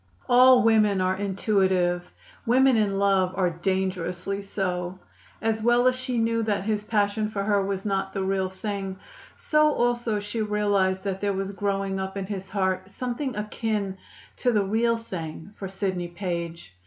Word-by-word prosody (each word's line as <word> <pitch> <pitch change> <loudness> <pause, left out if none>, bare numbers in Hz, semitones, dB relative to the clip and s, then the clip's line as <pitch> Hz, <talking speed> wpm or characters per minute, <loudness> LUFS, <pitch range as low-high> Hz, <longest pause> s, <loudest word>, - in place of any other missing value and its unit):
All 250 0 +7
women 215 -3 +4
are 185 0 +1
intuitive; 190 -3 +1 0.4
women 260 +2 +4
in 205 -3 +1
love 195 -2 +2
are 180 -2 +2
dangerously 185 +1 -2
so. 185 -2 -3 0.5
As 220 0 0
well 240 +2 +3
as 255 - +3
she 255 -1 -3
knew 230 0 +1
that 210 -3 0
his 210 0 -1
passion 210 0 0
for 200 -2 -3
her 200 -1 +2
was 195 0 -3
not 195 -2 -1
the 195 - -2
real 190 -1 0
thing, 195 0 -4 0.4
so 305 0 +3
also 240 -4 0
she 210 +2 -4
realized 205 -3 +1
that 195 -1 -3
there 200 -1 +1
was 195 0 -3
growing 195 -1 -1
up 190 +1 -4
in 195 - -3
his 190 -1 -5
heart 190 -1 -1
something 250 +4 -3
akin 210 -2 -2 0.4
to 250 - +2
the 210 -3 +2
real 230 +4 +1
thing 170 -5 -7
for 195 - -6
Sidney 190 -2 -2
Page. 170 - -5
200 Hz, 165 wpm, -26 LUFS, 190-220 Hz, 0.5 s, All